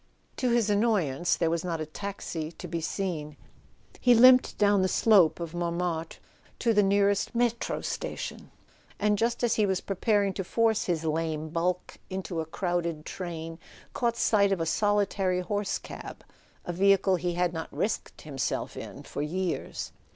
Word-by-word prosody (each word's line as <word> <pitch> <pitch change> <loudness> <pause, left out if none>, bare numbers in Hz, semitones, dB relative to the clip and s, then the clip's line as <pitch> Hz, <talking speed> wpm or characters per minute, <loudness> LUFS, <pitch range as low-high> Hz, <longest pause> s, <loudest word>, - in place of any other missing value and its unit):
To 255 - +1
his 235 -3 +2
annoyance 195 - +2
there 165 -2 +1
was 170 -1 -1
not 170 -3 -2
a 155 - -2
taxi 165 -2 -5
to 180 - -8
be 165 0 -3
seen. 160 -4 -3 0.6
He 245 -1 +5
limped 255 +2 +6
down 205 -1 +4
the 185 - +3
slope 190 -5 +4
of 170 -1 -5
Montmartre 170 -1 -2 0.4
to 230 -2 +2
the 210 - +5
nearest 200 +3 +2
in6tro 235 -1 0
station, - - -5 0.5
and 210 0 +2
just 235 +3 0
as 235 -2 +2
he 210 -2 +3
was 190 -1 +1
preparing 200 0 +1
to 190 - -3
force 225 +3 +1
his 165 -3 -1
lame 160 0 -1
bulk 175 +2 -2
into 185 -3 -3
a 160 - -6
crowded 170 -2 -2
train, 165 -2 -6 0.3
caught 235 -1 0
sight 200 -2 +3
of 195 - +1
a 165 - 0
solitary 195 -1 +1
horse 205 +2 -1
cab: - - -9 0.4
a 175 - -3
vehicle 195 0 +4
he 175 0 -2
had 175 -1 +1
not 160 -1 -5
risked 215 - -3
himself 140 -4 -3
in - - -8
for - - -5
years. 175 +4 -3
185 Hz, 165 wpm, -28 LUFS, 165-205 Hz, 0.6 s, limped